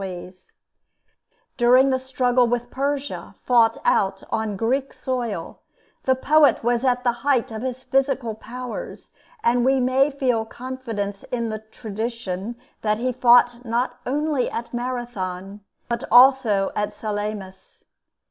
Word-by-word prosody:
[Illustration: 185 -2 -6
AESCHYLUS] 185 0 -22 1.1
During 255 +2 +5
the 260 - +1
struggle 255 -1 +2
with 240 0 -2
Persia, 280 +1 -3
fought 235 -2 +4
out 195 0 +2
on 220 -2 -1
Greek 260 +6 -1
soil, 240 -10 -4 0.5
the 260 - +4
poet 295 +1 +4
was 240 +1 +1
at 250 -1 +1
the 245 - +3
height 275 -5 +1
of 220 -1 -5
his 255 0 -4
physical 270 -4 0
powers, 245 +3 -8 0.3
and 240 +1 +3
we 265 +1 +3
may 260 +3 +3
feel 255 -5 0
confidence 225 -5 -5
in 235 -2 -3
the 215 0 -4
tradition 220 -1 -5 0.3
that 210 -1 +1
he 255 +3 -1
fought 245 0 +4
not 245 +1 -1
only 290 -1 0
at 235 +1 -6
Marathon, 210 -6 -4 0.3
but 235 +1 -2
also 245 -5 +5
at 210 0 -2
Salamis. 205 -3 -6
240 Hz, 135 wpm, -23 LUFS, 215-260 Hz, 1.1 s, During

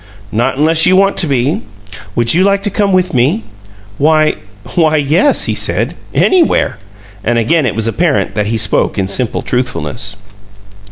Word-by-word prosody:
"Not 120 +4 -1
unless 160 +3 +3
you 185 - +4
want 195 +1 +3
to 170 - +1
be. 135 +1 0 0.5
Would 120 0 +2
you 180 +3 +3
like 200 0 +1
to 205 - -2
come 200 0 0
with 185 -1 +1
me?" 140 - +1 0.6
"Why 155 +1 +2 0.4
why 155 -3 +2
yes," 155 - +2
he - - -1
said. - - 0 0.2
"Anywhere!" 365 -4 +2 0.4
And 120 +1 0
again 130 +6 +1
it 105 - -3
was 115 0 -1
apparent 155 +6 0
that 105 -1 -1
he 115 +1 -1
spoke 110 0 0
in 95 -1 0
simple 115 +4 -1
truthfulness. 125 -4 -3
150 Hz, 165 wpm, -13 LUFS, 120-180 Hz, 0.6 s, you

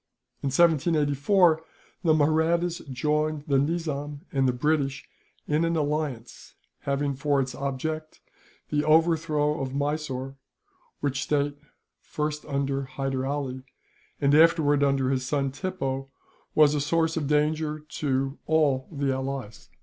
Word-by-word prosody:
In - - -2
1784, 160 +2 +3 0.4
the 160 -3 +4
Mahrattas 160 +3 +2
joined 150 +3 0
the 140 -2 +2
Nizam 145 -2 -2
and 135 -1 +2
the - - +3
British 140 +1 -1 0.4
in 150 +2 +1
an 165 0 +1
alliance, 145 -6 -3 0.3
having 140 0 0
for 140 +1 +1
its 130 -1 -1
object 155 +4 -4 0.5
the 150 0 +1
overthrow 155 -2 +2
of 135 0 -4
Mysore; 140 -2 -2 0.6
which 140 -1 -1
state, 145 -1 0 0.4
first 150 0 -4
under 140 0 -1
Hyder 135 0 -3
Ali, 135 -2 -3 0.6
and 140 0 +3
afterwards 155 -2 +5
under 135 -2 +2
his 130 -1 0
son 135 +1 -1
Tippoo, 135 -5 -3 0.5
was 150 -1 +6
a 145 - 0
source 160 +2 +1
of 155 -4 -1
danger 150 +1 +1
to 140 -2 -2
all 145 -5 +2
the 140 -3 -1
allies. 130 -4 -5
145 Hz, 125 wpm, -26 LUFS, 135-155 Hz, 0.6 s, was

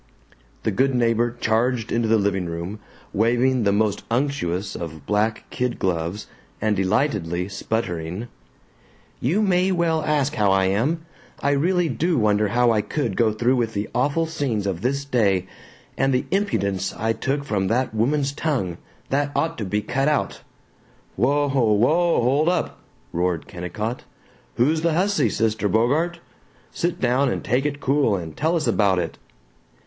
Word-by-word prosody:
The 110 - +1
good 130 +6 +1
neighbor 120 0 +1
charged 115 +1 0
into 115 -1 +1
the 110 0 +4
living 100 -3 0
room, 85 +5 -5 0.3
waving 120 +4 +2
the 100 - +4
most 105 0 +1
unctuous 115 -8 -1
of 80 -4 -7
black 105 +4 0
kid 125 -1 -1
gloves 90 +2 -2 0.3
and 110 -1 +1
delightedly 95 - 0
sputtering: 95 -1 -3 0.9
"You 180 - +1
may 185 -1 +2
well 170 -3 +1
ask 150 -2 +1
how 105 -2 +2
I 95 0 +3
am! 135 - 0 0.4
I 140 - +3
really 175 +5 +2
do 160 +6 0
wonder 105 -2 +2
how 120 +3 +3
I 110 -2 +2
could 150 +7 -2
go 115 -2 +3
through 120 +3 +2
the 105 -2 -4
awful 145 +6 +1
scenes 140 -10 -2
of 95 -3 -2
this 140 +4 -1
day 100 -9 +2 0.5
and 135 0 +1
the 125 - +1
impudence 100 - 0
I 110 +1 0
took 140 +4 -2
from 100 -9 -1
that 125 +2 0
woman's 135 +6 +1
tongue, 135 - -2 0.3
that 145 +1 +1
ought 165 +1 0
to 105 - -2
be 105 +2 -1
cut 135 +3 0
out 150 -1 0 0.4
" - - -33
"Whoa! 145 +4 +2
Whoa! 135 +6 +3
Hold 140 +7 +3
up!" 180 -3 -1 0.3
roared 85 -1 0
Kennicott. 105 +6 -4 0.5
"Who's 155 +7 +2
the 165 -1 +1
hussy, 175 - +2
Sister 110 -1 0
Bogart? 145 - +1 0.5
Sit 175 0 -2
down 130 +2 +2
and - - -3
take 130 +4 +1
it 145 -1 -4
cool 135 -6 +2
and 85 -4 -6
tell 160 +4 +1
us 160 -2 0
about 100 -3 +2
it." 85 -2 -3
120 Hz, 160 wpm, -23 LUFS, 100-145 Hz, 0.9 s, the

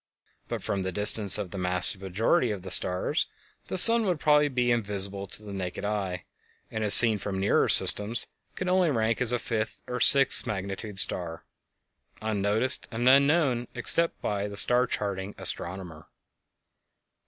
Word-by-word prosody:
But - - -8
from 100 - -5
the 95 0 -5
distance 105 +1 +4
of 100 -4 -8
the 100 - -9
vast 90 0 -1
majority 110 - -2
of 100 -4 -7
the 95 - -7
stars 90 +1 -1 0.4
the - - -5
sun 230 +3 +7
would 175 -4 -3
probably 150 -1 +1
be 125 -3 -3
invisible 100 -3 -3
to 105 - -5
the 100 -1 -11
naked 95 +1 -8
eye, 100 -4 -6 0.5
and 110 - -6
as 105 - +5
seen 110 -3 +6
from 95 -2 -7
nearer 95 - -1
systems 105 +3 +4 0.3
could 185 - -7
only 180 -2 0
rank 115 -4 -3
as 125 -2 +3
a 125 - -1
fifth 110 -2 -7
or 125 0 -7
sixth 135 +2 +5
magnitude 100 +1 -8
star, 85 -3 0 0.7
unnoticed 110 +3 -1
and 120 +2 -5
unknown 140 -2 +1
except 165 +7 0
by 100 -1 -4
the 100 -1 -9
star 125 +3 +1
charting 100 -2 -6
astronomer. 85 -3 -1
105 Hz, 160 wpm, -24 LUFS, 95-125 Hz, 0.7 s, sun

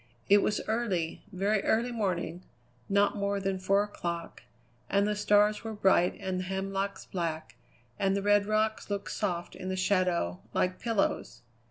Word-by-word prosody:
It 205 +1 +8
was 210 - 0
early, 205 -8 -1
very 200 +2 +1
early 235 +2 +2
morning, 185 -6 -2 0.5
not 200 0 +3
more 200 0 -1
than 195 -1 -1
four 195 +2 +3
o'clock, 170 -5 -5 0.5
and 200 0 +3
the 210 0 0
stars 210 +1 +3
were 220 -1 -5
bright 190 -3 +3
and 190 -2 -2
the - - -2
hemlocks 195 +1 -3
black, 160 -9 -4 0.4
and 195 0 +2
the 200 - -2
red 205 0 +4
rocks 215 0 0
looked 200 -1 -3
soft 175 -4 -2
in 185 - -6
the 190 - -1
shadows, 185 - +1 0.2
like 185 0 +1
pillows. 225 - -1
195 Hz, 160 wpm, -30 LUFS, 185-205 Hz, 0.5 s, It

